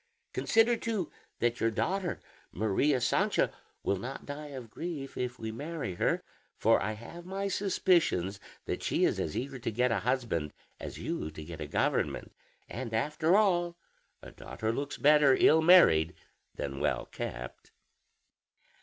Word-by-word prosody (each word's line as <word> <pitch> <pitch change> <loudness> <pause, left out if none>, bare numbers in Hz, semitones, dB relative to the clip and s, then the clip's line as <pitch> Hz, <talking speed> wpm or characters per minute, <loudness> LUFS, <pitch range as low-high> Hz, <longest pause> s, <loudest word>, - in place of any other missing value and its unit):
Consider, 230 +1 +3
too, 215 -8 -2 0.3
that 120 0 0
your 115 - +2
daughter 185 - -1 0.3
Maria 110 +8 +1
Sancha - - +2 0.3
will 100 - +1
not 130 +7 -6
die 145 +1 -6
of 130 -6 -9
grief 155 -4 -5
if 125 0 -3
we 110 -1 -4
marry 145 - -4
her; - - 0 0.3
for - - +4
I 110 - -1
have 115 +11 -10
my 195 +2 -3
suspicions 175 - +1 0.3
that - - -3
she - - +2
is - - +1
as 75 - -2
eager 135 +1 -4
to 115 - -2
get 125 +3 +1
a 110 - +1
husband 115 - -1 0.3
as - - -7
you 75 - -3
to 80 0 -9
get 80 -1 -8
a 75 - -4
government; - - 0 0.4
and 115 -2 -5
after 155 - +2
all, 175 -5 +2 0.5
a - - -10
daughter 110 0 -4
looks 140 +4 -3
better 150 -2 +5
ill 160 +1 +6
married 90 - +6 0.4
than 70 -1 -4
well - - 0
kept." - - -7
130 Hz, 155 wpm, -30 LUFS, 110-170 Hz, 0.5 s, ill